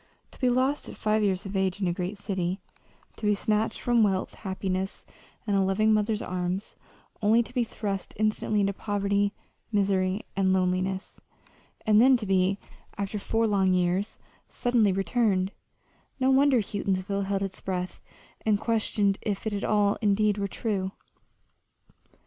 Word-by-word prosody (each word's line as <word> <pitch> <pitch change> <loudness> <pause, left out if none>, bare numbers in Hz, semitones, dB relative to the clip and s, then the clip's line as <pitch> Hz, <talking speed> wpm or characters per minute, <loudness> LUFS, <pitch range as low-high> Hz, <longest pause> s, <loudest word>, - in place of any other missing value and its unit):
To - - -17
be 255 - +3
lost 260 +4 +1
at - - -10
five 215 0 +1
years 195 -2 0
of 195 +1 -6
age 190 0 0
in 190 - 0
a 175 - +1
great 180 +3 -4
city, 190 -2 -2 0.6
to 210 - -2
be 210 - +4
snatched 215 +2 0
from 240 -1 +2
wealth, 195 -3 +1
happiness, 190 -1 -3 0.4
and 205 -2 +1
a 195 - +4
loving 195 +3 +3
mother's 215 0 +1
arms, 180 +2 -3 0.5
only 220 +3 +4
to - - -13
be 245 - +2
thrust 200 -4 -4
instantly 215 0 +1
into 200 0 +1
poverty, 200 0 0 0.4
misery, 195 -1 +1
and 190 -1 +2
loneliness; 185 +1 -1 0.6
and 215 0 +5
then 260 +1 +6
to 225 - -6
be, 190 0 +2 0.4
after 200 +1 -3
four 225 +3 0
long 195 -3 +3
years, 180 +3 0 0.3
suddenly 235 -5 +2
returned 195 -1 +1 0.7
no 260 0 +3
wonder 265 -2 +5
Houghtonsville 200 -1 -2
held 195 0 -1
its 190 -1 -5
breath 185 -1 -4 0.4
and 210 -2 +2
questioned 210 -3 +1
if 205 -2 -3
it 205 -2 -2
all 205 -1 +2
indeed 210 0 +2
were 200 - 0
true. 195 -2 -2
200 Hz, 155 wpm, -27 LUFS, 190-215 Hz, 0.7 s, then